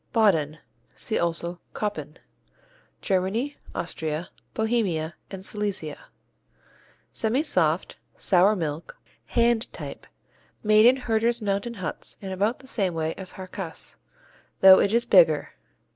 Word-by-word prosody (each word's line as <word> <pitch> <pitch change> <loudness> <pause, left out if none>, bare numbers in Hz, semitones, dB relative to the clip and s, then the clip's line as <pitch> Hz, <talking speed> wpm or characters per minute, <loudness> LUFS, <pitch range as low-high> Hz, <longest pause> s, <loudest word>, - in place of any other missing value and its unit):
Bauden 160 -9 +3 0.4
(see 220 - -1
also 170 +1 -1 0.2
Koppen) 155 -8 -4 0.9
Germany, 200 +9 0 0.2
Austria, 160 -1 -3 0.3
Bohemia 205 -9 0 0.2
and 190 -1 -8
Silesia 210 - -4 1.1
Semisoft, 215 - 0 0.2
sour 195 +3 +4
milk, 160 - -4 0.3
hand 235 -1 +2
type, - - -8 0.6
made 215 +1 +6
in 250 - +6
herders' 235 -2 0
mountain 205 +2 -2
huts 185 -4 -3
in 195 -1 -6
about 205 +6 0
the 265 - -16
same 195 -9 0
way 160 0 -1
as 190 -1 -6
Harzkäse, 185 -2 -6 0.6
though 190 0 +10
it 200 - +2
is 235 +1 +2
bigger. - - +4
200 Hz, 115 wpm, -25 LUFS, 170-225 Hz, 1.1 s, though